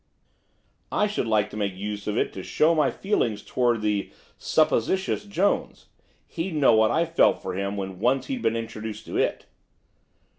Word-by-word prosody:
I 210 - +2
should 205 - -2
like 105 -1 +1
to - - -7
make 100 -3 -2
use 105 +1 -5
of 105 +1 -1
it - - 0
to 95 - -6
show 155 - +2
my 155 -3 +3
feelings 120 - -1
towards 120 -3 0
the 105 -2 -1 0.2
supposititious 190 - +1
Jones, 200 -1 -1 0.4
he'd 165 0 -4
know 145 -5 +5
what 110 0 +4
I 165 +1 +2
felt 165 0 +3
for - - -5
him 100 +2 -3
when 95 -2 -5
once 130 +5 +1
he - - -4
had 255 - -4
been 115 - +1
introduced 110 -1 -6
to - - -4
it. - - 0
115 Hz, 180 wpm, -25 LUFS, 105-165 Hz, 0.4 s, know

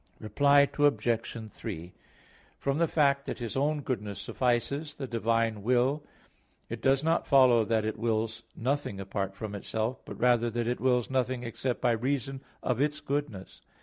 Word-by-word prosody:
Reply 140 +6 +4
Obj. 115 -5 +1
3: 90 -5 -7 0.6
From 140 +2 -1
the 170 - +3
fact 140 -3 +2
that - - -3
His 120 -3 -5
own 145 +2 +1
goodness 105 -6 -3
suffices 140 +5 -1
the 135 - -5
divine 115 -2 0
will, 125 +6 +2 0.7
it - - -5
does 135 +1 +3
not 165 +1 +1
follow 130 -5 +6
that 110 -1 +1
it 110 -1 -3
wills 115 0 -1
nothing 130 -5 -2
apart 95 0 -3
from 105 0 -6
itself, 110 +4 -3
but - - -9
rather 120 -1 +3
that 120 +1 -2
it 120 +1 -1
wills 125 -1 +2
nothing 130 -1 0
except 120 +1 -3
by 125 - +3
reason 135 +3 -1 0.2
of 125 0 0
its 150 +1 0
goodness. 145 -9 -4
125 Hz, 160 wpm, -29 LUFS, 110-140 Hz, 0.7 s, follow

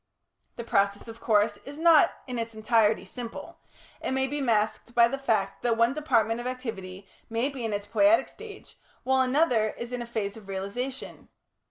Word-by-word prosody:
The 235 - -6
process, 200 -1 0
of 225 0 -10
course, 210 -1 +2
is 285 +1 -9
not 325 -1 +6
in 250 -3 -4
its 230 -1 -5
entirety 220 -2 +2
simple; 230 +4 -8 0.4
it - - -2
may 265 0 +1
be 290 +2 -3
masked 230 -1 0
by 235 -1 +7
the 275 +3 -4
fact 215 -7 -1
that 235 -2 +1
one 230 +2 +3
department 230 -7 +1
of 245 - -5
activity 195 -7 -6 0.2
may 230 +4 0
be 270 -4 -7
in 225 - -2
its 205 0 -3
poietic 305 +9 +3
stage, 425 -2 -12 0.2
while 265 0 +2
another 255 -5 +2
is 235 +1 -6
in 245 - -3
a 240 - -6
phase 210 -4 -3
of 215 -3 -13
realisation. 200 +8 -5
235 Hz, 185 wpm, -27 LUFS, 215-265 Hz, 0.4 s, by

